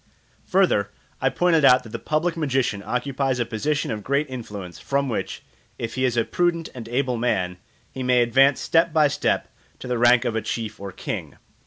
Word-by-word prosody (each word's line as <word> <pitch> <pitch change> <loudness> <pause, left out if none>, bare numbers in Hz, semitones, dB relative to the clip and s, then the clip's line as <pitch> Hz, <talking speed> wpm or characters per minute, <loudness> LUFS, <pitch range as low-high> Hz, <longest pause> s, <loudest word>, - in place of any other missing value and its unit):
Further, 180 - +2 0.3
I 135 - +3
pointed 165 0 +2
out 130 -2 +6
that 115 - -11
the 115 - -5
public 165 +6 0
magician 135 -9 0
occupies 130 +1 -1
a 120 - +1
position 135 +7 -1
of 105 -2 -4
great 140 +5 0
influence, 105 -8 -7
from 140 0 -1
which, 115 - -4 0.3
if 115 -1 -4
he 130 0 0
is 120 -2 0
a 115 - +2
prudent 170 -2 0
and 115 -3 -8
able 125 0 0
man, 90 -7 -1 0.3
he 130 - -6
may 125 -1 +3
advance 135 +4 +4
step 165 +1 +2
by 155 -2 +5
step 140 - 0 0.3
to - - -9
the 125 -1 -1
rank 120 0 +5
of 115 - -1
a 110 - 0
chief 110 0 -4
or 100 -1 -6
king. - - -5
125 Hz, 195 wpm, -23 LUFS, 115-140 Hz, 0.3 s, out